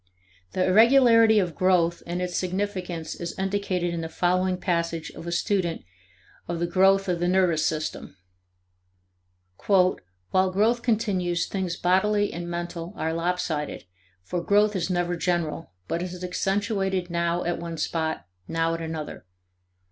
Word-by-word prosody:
The 185 - +1
irregularity 230 +2 +6
of 180 -5 +1
growth 170 0 +2
and 175 +1 -2
its 180 -1 -3
significance 185 -3 -3
is 170 -1 -6
indicated 190 -3 -1
in 170 - -3
the 160 - -5
following 185 +2 +1
passage 170 -2 -2
of 170 - -10
a - - -2
student 175 -1 0 0.6
of 170 - -2
the 170 - +1
growth 195 +3 +3
of 175 -2 0
the 175 - 0
nervous 180 -4 +2
system. 155 -9 -4 1.5
"While 185 -2 +4 0.3
growth 200 +6 +2
continues, 190 -7 0
things 185 -3 -3
bodily 205 +3 +2
and 175 +1 -5
mental 175 +1 -5
are 160 0 -1
lopsided, 165 -3 -2 0.4
for 175 - -3
growth 205 +3 +3
is 180 -1 -1
never 175 -1 0
general, 170 - -1 0.2
but 170 - -2
is 180 0 -6
accentuated 195 -1 -1
now 170 0 0
at 175 -1 -2
one 170 -1 -5
spot, 160 - -2 0.2
now 165 0 0
at 165 - -4
another. 160 - -6
180 Hz, 140 wpm, -25 LUFS, 170-190 Hz, 1.5 s, irregularity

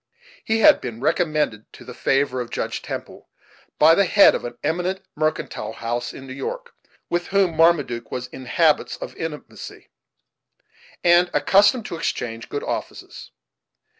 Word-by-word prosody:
He 225 0 0
had 305 +3 +6
been 115 -2 -6
recommended 150 - -1
to - - -13
the - - -9
favor 135 -2 0
of 120 - -6
Judge - - -3
Temple - - -8 0.5
by 160 +2 +7
the 200 +3 +3
head 200 +3 +6
of - - -3
an 120 0 -7
eminent 180 +5 -1
mercantile 155 -8 -2
house 120 +1 -3
in 135 - -11
New 130 - -8
York, 485 - -6 0.3
with 175 0 -2
whom 195 -4 +1
Marmaduke 155 -8 +2
was 125 -1 -4
in 130 0 -11
habits 155 +3 +2
of - - -8
intimacy, 160 -2 -8 1.1
and 175 +1 +5
accustomed 200 - +4
to 170 - -5
exchange 115 -6 -4
good 145 - -4
offices. - - -6
155 Hz, 150 wpm, -22 LUFS, 125-180 Hz, 1.1 s, by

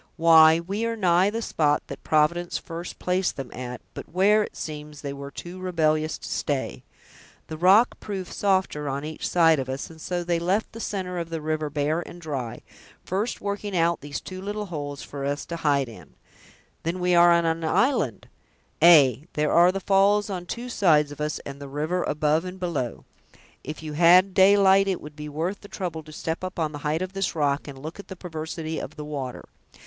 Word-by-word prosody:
"Why, 160 -1 +7
we 195 +6 -3
are 230 - -2
nigh 185 -2 +3
the 225 +2 -3
spot 150 -6 +1
that - - -9
Providence 165 +3 +1
first 170 +2 -7
placed 180 +1 0
them 135 -2 -6
at, 125 -1 -6
but - - -8
where, 200 +4 +4
it - - -5
seems, 150 -1 -7
they 140 -1 -4
were 140 0 -7
too 175 +5 -9
rebellious 155 -4 0
to - - -9
stay. - - -2 0.6
The 155 - -7
rock 195 +8 +5
proved 195 -3 -6
softer 190 -7 0
on 140 +2 -3
each 155 0 -4
side 165 -3 +4
of 130 -1 -4
us, 135 +4 -5
and 160 -1 -14
so 175 +1 -2
they 170 -1 0
left 190 +6 0
the 225 - -9
center 185 -5 -3
of 165 -1 -4
the 165 -1 -3
river 155 0 -2
bare 150 +3 0
and 175 - -10
dry, 135 -8 -5 0.4
first 200 +6 -2
working 200 -1 -3
out 170 0 +2
these 145 0 -5
two 185 0 -8
little 210 +2 -4
holes 145 -6 -6
for 140 -1 -7
us 145 +1 -2
to 170 - -5
hide 145 -4 +1
in." 90 -10 -13 0.7
"We 180 +2 0
are 175 0 +7
then 170 0 +2
on 165 0 +1
an 165 - -9
island!" 160 - +1 0.5
"Ay! 150 -4 +6
there 150 0 0
are 175 +1 +6
the 195 - -3
falls 200 +2 +3
on 180 -2 -5
two 240 +6 -5
sides 155 -10 +3
of 145 - -8
us, 150 0 -1
and 140 0 -8
the 140 - -7
river 155 +6 -1
above 150 +2 +1
and 185 +1 -7
below. 155 -10 -3 0.6
If 155 +1 -7
you 155 -1 -5
had 180 +4 +6
daylight, 195 0 +5
it 190 -2 0
would 150 0 -11
be 150 0 -7
worth 165 +7 -3
the 205 - -11
trouble 175 -5 -4
to 155 0 -14
step 160 +3 -4
up 185 +1 -5
on 160 -3 0
the 145 - -7
height 155 +4 -1
of 185 +1 -6
this 195 -2 -2
rock, 145 -2 0
and 140 -2 -8
look 155 +7 -8
at 200 - -10
the 190 - -8
perversity 160 -2 -5
of - - -7
the 150 - -7
water. 140 -4 -5
165 Hz, 210 wpm, -25 LUFS, 150-185 Hz, 0.7 s, Why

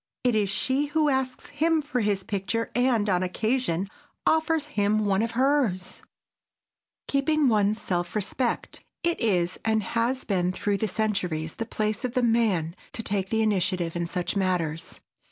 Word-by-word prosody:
It 250 -1 +3
is 210 -2 +2
she 265 +8 +1
who 300 0 +2
asks 265 -2 -1
him 315 +3 +1
for 285 -4 -2
his 205 -3 0
picture 210 +3 -2
and, 245 -4 +2
on 180 -3 +2
occasion, 195 -1 0 0.4
offers 320 -1 +2
him 210 +1 +2
one 195 0 +2
of 230 0 -1
hers. 260 -8 +2
[Sidenote: 185 - -14 1.0
KEEPING 290 +1 +2
ONE'S 210 -1 +2
SELF 175 -2 -2
RESPECT] 215 +4 -2 0.2
It 340 0 +1
is, 180 -6 +1
and 220 -1 +1
it - - -7
has 240 +3 0
been 180 -3 0
through 200 +2 -1
centuries, 185 -7 -1
the 230 - -5
place 215 -2 -2
of 250 -2 -2
the 250 - +2
man 210 -8 +2 0.2
to 225 - -4
take 195 -2 -1
the 220 0 +2
initiative 185 -5 0
in 170 0 -1
such 175 +3 -2
matters. 170 -4 -1
215 Hz, 165 wpm, -26 LUFS, 185-250 Hz, 1.0 s, It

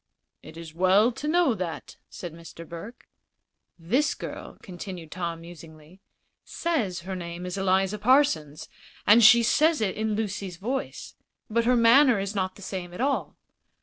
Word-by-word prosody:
"It - - -13
is 165 -2 -10
well 190 +7 +3
to 290 +5 -6
know 335 -4 +3
that," 175 -7 -6
said 175 -3 -8
Mr. 165 0 -12
Burke. 200 +9 -10 0.7
"This 225 - 0
girl," - - -8
continued 175 -3 -9
Tom, 170 -2 -4
musingly, 165 +1 -14 0.4
"says 225 - -2
her 190 +2 -6
name 175 0 -7
is 180 0 -4
Eliza 195 +1 +1
Parsons, 205 - +2 0.4
and 225 +3 +6
she 235 +2 +8
says 310 +7 +3
it 210 -4 -1
in 215 0 -1
Lucy's 200 -4 -4
voice. 250 +8 -5 0.4
But 230 +1 +1
her 250 +1 +3
manner 240 +2 +5
is 195 +1 -3
not 185 -2 -2
the 200 - -13
same 180 -2 -6
at - - -9
all. 275 +2 -1
195 Hz, 155 wpm, -26 LUFS, 175-235 Hz, 0.7 s, she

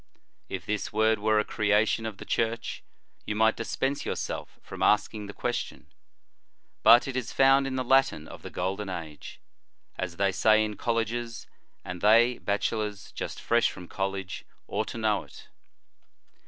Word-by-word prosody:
If - - -5
this 105 -1 -2
word 110 0 +2
were 110 +1 +2
a 105 - +2
creation 110 +2 +1
of 105 -3 -7
the - - -9
Church, 115 0 -2 0.4
you 105 - -3
might 110 +1 +4
dispense 135 +4 -2
yourself - - -4
from - - -9
asking 105 0 +2
the - - -6
question, 100 - -4 0.9
but 120 +3 +7
it 135 - -4
is 130 -3 -2
found 135 0 +4
in 130 - -3
the 130 - -1
Latin 135 - +2
of - - -11
the - - -8
Golden 95 +3 -3
Age, 80 -5 -7 0.6
as 90 -2 -3
they 100 -1 +2
say 110 +3 +4
in 105 -1 -5
colleges, 115 +1 -2 0.4
and 90 -1 -6
they, 115 +4 +5
bachelors 105 0 -2
just - - -5
fresh 120 0 +2
from 90 - -10
college, 95 -1 -4 0.2
ought - - -2
to - - -6
know 110 -2 +1
it. - - -15
110 Hz, 160 wpm, -28 LUFS, 100-115 Hz, 0.9 s, but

